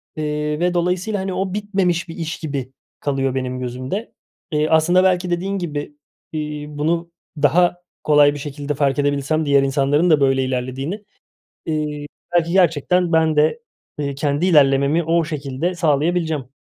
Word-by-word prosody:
Eee, 150 0 -2
ve 175 +1 +1
dolayısıyla, 180 +4 0
hani, 190 0 -3
o 185 0 -2
bitmemiş 190 -5 -1
bir 165 - -7
iş 165 -2 -4
gibi 140 -5 -4 0.3
kalıyor 135 -2 -1
benim 130 -1 -3
gözümde. 130 - -5 0.4
Eee, 150 0 +1
aslında 175 +3 +4
belki 185 -1 +2
dediğin 185 +3 -1
gibi, 150 -5 -5 0.4
iii, 150 -1 -5
bunu 165 +3 -1 0.3
daha 175 +5 +3 0.2
kolay 145 -1 +5
bir 145 - -6
şekilde 145 0 -4
farkedebilsem 145 +2 0
diğer 140 -1 +4
insanların 140 +5 +2
da 155 -2 +5
böyle 135 -1 +3
ilerlediğini, 130 - -3 0.7
ııı, 155 -1 0 0.5
belki 170 -1 +2
gerçekten 180 0 +2
ben 160 -1 +3
de, 155 +10 +2 0.4
eee, 140 -1 -2
kendi 145 +3 0
ilerlememi 145 -1 +4
o 165 +1 +2
şekilde 150 +3 -3
sağlayabileceğim. 160 -3 0
155 Hz, 145 wpm, -20 LUFS, 140-175 Hz, 0.7 s, kolay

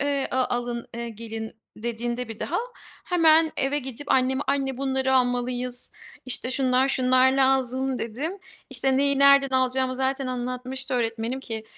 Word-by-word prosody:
eee, 280 -1 0
a 260 0 +2
alın, 240 -1 -4
eee, 235 0 -4
gelin 225 0 -7 0.2
dediğinde 235 +2 -3
bir 225 - -8
daha 340 - -2 0.5
hemen 325 -2 +4
eve 275 +2 0
gidip 265 +1 -7
anneme, 265 +1 +2
"Anne 270 -1 0
bunları 265 0 0
almalıyız, 245 0 +1 0.3
işte, 255 0 -3
şunlar, 260 0 +2
şunlar 255 0 +3
lazım." 265 -1 +1
dedim. 280 - -4 0.3
İşte, 265 -1 +1
neyi 280 0 +2
nereden 280 -1 +6
alacağımı 260 0 +1
zaten 265 +1 -1
anlatmıştı 255 +2 -4
öğretmenim 230 +1 -2
ki 225 -4 -6
260 Hz, 145 wpm, -25 LUFS, 245-270 Hz, 0.5 s, nereden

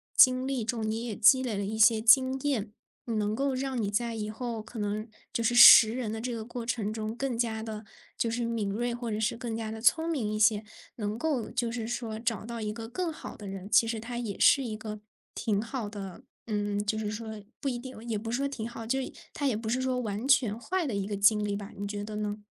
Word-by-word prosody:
经 255 0 +6
历 265 -4 -1
中， 225 -1 -2
你 225 +2 -2
也 225 -4 -4
积 260 +5 +6
累 240 -5 -2
了 200 - -2
一 215 +2 -4
些 220 0 +5
经 260 +4 +5
验， 240 -8 -1 0.3
能 215 -2 -1
够 275 +2 0
让 260 -1 -2
你 205 -1 -1
在 235 +2 -1
以 215 -1 -4
后， 230 0 -4
可 225 +1 -9
能 210 +1 -2 0.3
就 230 - -1
是 230 - +2
识 235 -2 +10
人 240 -4 -3
的 220 - -4
这 245 +1 -3
个 225 -1 -4
过 240 0 -6
程 220 -3 -1
中， 220 0 -4
更 255 -2 -2
加 225 -2 -1
地 220 -1 -6 0.3
就 230 - 0
是 240 +1 -1
敏 230 -3 -1
锐， 240 +4 -1
或 240 -1 -4
者 210 - -2
是 220 +1 0
更 235 -3 -4
加 220 0 -4
聪 320 +8 +3
明 250 -10 -1
一 215 - -2
些， 215 -1 +4 0.3
能 210 -1 -3
够 280 -4 -1
就 235 -1 -1
是 230 -2 -4
说 230 -2 -4
找 230 -3 -2
到 235 0 -6
一 210 -1 -2
个 225 0 -7
更 340 +7 -2
好 - - -9
的 205 - -9
人， 195 0 -7
其 230 - +5
实 225 -1 -2
它 240 +2 -6
也 225 -5 -4
是 275 - +6
一 225 -4 -4
个 215 -1 -7 0.3
挺 210 -2 0
好 230 -1 -4
的 200 +1 -8 0.2
嗯， 205 -2 -1
就 215 +1 0
是 215 -1 -2
说 220 -1 -6 0.2
不 280 - -4
一 250 -3 -1
定， 260 +1 -9
也 225 -2 -1
不 225 +2 -5
是 240 - 0
说 280 - 0
挺 240 -5 -5
好， 230 -1 -8
就 265 +2 +1
是 - - -5 0.2
它 285 - -1
也 240 -6 +1
不 220 0 -6
是 245 +4 0
说 255 -1 0
完 215 +1 -3
全 240 -6 +3
坏 365 +8 -2
的 245 - -3
一 200 -1 -1
个 205 -1 -3
经 210 +1 +4
历 205 -1 -1
吧。 200 -1 -7
你 200 +1 -4
觉 205 0 -4
得 210 0 -6
呢？ 210 0 -4
225 Hz, 275 characters per minute, -29 LUFS, 215-245 Hz, 0.3 s, 识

